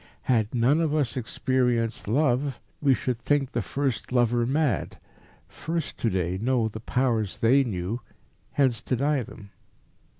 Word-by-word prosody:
Had 110 -2 +1
none 130 +7 +3
of 155 -2 +1
us 140 -7 0
experienced 120 -2 0
love, 135 +2 +1 0.2
we 140 -3 +4
should 125 -2 -2
think 140 +1 +1
the - - -1
first 135 -4 -2
lover 120 -1 +2
mad. 145 +1 0 0.5
Few 165 +1 -3
to 130 -6 -2
day 90 -1 -1
know 120 -1 +2
the 110 0 -7
Powers 115 -3 0
they 130 +5 +4
knew, 105 0 -3 0.5
hence 130 -6 +2
deny 140 +2 0
them. 100 -3 -11
125 Hz, 140 wpm, -26 LUFS, 115-140 Hz, 0.5 s, we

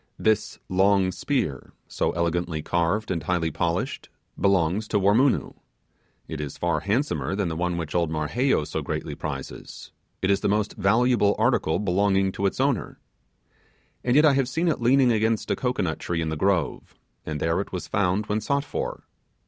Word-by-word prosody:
This 110 0 +1
long 95 0 +3
spear, 90 - -2
so - - -1
elegantly 85 -2 -1
carved, 85 +7 0
and 85 -3 -1
highly 80 0 0
polished, 85 +2 -2 0.3
belongs 100 +1 +1
to 105 - +1
Wormoonoo: 110 +8 +3 0.7
it - - -5
is 75 -2 -6
far 85 -2 0
handsomer 105 - -1
than 100 -4 -1
the 80 - -3
one 90 +1 -1
which 85 -3 -4
old 85 -2 +1
Marheyo 80 - +1
so - - -3
greatly - - -4
prizes; 70 -3 -7 0.3
it 95 - +3
is 100 - +2
the - - +1
most 105 0 0
valuable 110 +1 +3
article 80 - +2
belonging 95 0 +2
to 100 +1 0
its 95 - -4
owner. 135 -6 0 1.0
And 125 0 +1
yet 150 +2 +6
I 150 - +6
have 135 -2 +1
seen 165 +6 0
it 155 - -1
leaning 125 +1 +4
against 110 0 +1
a - - +2
cocoanut 125 -10 -1
tree 85 -1 -2
in 80 - -2
the 80 - -2
grove, 95 +2 -1 0.3
and 75 -1 -4
there 80 +4 +1
it - - -8
was 90 - -5
found 100 +1 +1
when 105 +1 -1
sought 140 +6 0
for. - - -4
95 Hz, 175 wpm, -25 LUFS, 85-110 Hz, 1.0 s, yet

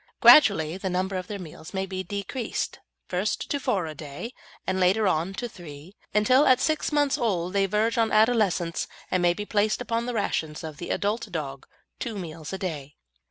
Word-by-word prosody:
Gradually 185 - +7
the 190 0 -3
number 185 +2 -1
of 185 -1 -3
their 205 - -4
meals 160 -1 -10
may 190 0 0
be 190 -1 -4
decreased, 205 +6 -4 0.3
first 185 +3 -2
to 285 - 0
four 195 -9 0
a 155 - -5
day, 150 - -7 0.3
and 190 0 0
later 195 +4 +3
on 180 +2 0
to 240 - -3
three, 170 -2 -11 0.2
until 255 +7 +4
at 255 -1 +6
six 310 +3 0
months 290 -2 +2
old 185 -6 0
they 195 -1 +2
verge 220 +4 +1
on 225 -1 +2
adolescence; 215 -6 +2 0.2
and 185 - +2
may 175 0 +3
be 210 - -4
placed 210 0 +1
upon 235 -1 -2
the 245 - -3
rations 160 -7 -2
of 155 -2 -7
the 175 - -6
adult 210 +1 -1
dog, 140 -5 -5 0.3
two 230 -4 -4
meals 160 -4 -7
a 190 - -3
day. 150 -7 -5
190 Hz, 195 wpm, -26 LUFS, 170-220 Hz, 0.3 s, Gradually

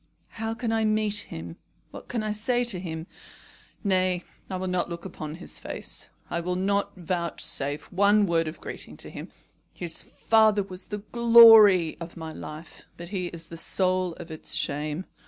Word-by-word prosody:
How 225 0 -2
can 235 -1 -2
I 225 0 +1
meet 215 -1 +1
him? 85 +1 -7 0.3
What - - -10
can 235 -3 -2
I 215 - -1
say 240 +4 0
to 235 -7 -1
him? 160 -3 -5 0.8
Nay, 185 -3 +1 0.3
I 190 - -3
will 185 0 -3
not 180 -1 0
look 170 +1 -7
upon 155 -4 -6
his 175 - -4
face. - - -6 0.2
I 170 - -2
will 180 +1 -2
not 200 +2 0
vouchsafe 170 -5 -2
one 205 +2 +4
word 165 -3 +1
of 155 - -6
greeting - - -7
to - - -6
him. - - -8 0.4
His 170 -2 -3
father 220 -2 +3
was 185 -1 -9
the 210 -1 -6
glory 225 -7 +8
of 170 0 -8
my 160 -1 -6
life, 155 +2 -10
but 170 0 -8
he 185 -3 -2
is 170 -1 -8
the 165 - -8
soul 185 0 +2
of 165 - -10
its 160 - -4
shame. 150 +4 -2
185 Hz, 175 wpm, -26 LUFS, 170-210 Hz, 0.8 s, glory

